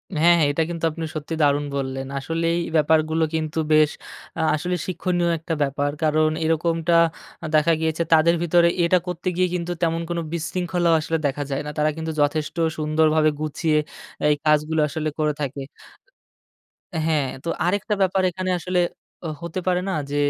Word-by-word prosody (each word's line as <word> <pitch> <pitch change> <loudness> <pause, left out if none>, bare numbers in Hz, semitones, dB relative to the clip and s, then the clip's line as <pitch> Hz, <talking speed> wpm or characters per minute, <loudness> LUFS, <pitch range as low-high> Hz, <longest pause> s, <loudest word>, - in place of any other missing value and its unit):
হ্যাঁ, 170 +3 +5
হ্যাঁ। 150 - +4
এটা 160 +3 +1
কিন্তু 170 -1 -6
আপনি 165 +1 -5
সত্যি 155 +2 -4
দারুণ 145 0 +3
বললেন। 135 -1 -3
আসলেই 165 +4 -1 0.2
ব্যাপারগুলো 160 +1 +3
কিন্তু 160 0 -2
বেশ, 155 -1 +5 0.5
আ - - -1
আসলেই 180 +3 -2
শিক্ষণীয় 175 -1 0
একটা 165 +1 -4
ব্যাপার। 145 0 0
কারণ 155 0 +3
এরকমটা 165 +1 +1 0.5
আ - - -4
দেখা 155 +2 +4
গিয়েছে, 160 +1 0
তাদের 165 +1 +5
ভিতরে 170 0 +4 0.2
এটা 170 +2 +4
করতে 180 +1 -5
গিয়ে 185 +1 +2
কিন্তু 175 0 -3
তেমন 165 0 +1
কোনো 170 0 -1
বিশৃঙ্খলাও 175 +1 0
আসলে 165 +1 -1
দেখা 145 +1 -3
যায় 135 - -1
না। - - -4
তারা 150 0 +2
কিন্তু 160 0 -3
যথেষ্ট 150 +1 0 0.2
সুন্দরভাবে 155 0 +3
গুছিয়ে, 155 +1 0 0.5
এই 150 - +4
কাজগুলা 150 +1 +2
আসলে 155 0 -2
করে 150 -1 +1
থাকে 140 0 -3 1.4
হ্যাঁ। 155 -3 +1 0.2
তো 170 - -3 0.2
আরেকটা 205 +3 0
ব্যাপার 190 0 +2
এখানে 185 +2 -4
আসলে 180 +1 -1 0.5
অ - - -1 0.2
হতে 170 +2 -4
পারে 180 0 +2
না? - - -1 0.2
যে, 145 - -2
160 Hz, 165 wpm, -23 LUFS, 150-170 Hz, 1.4 s, হ্যাঁ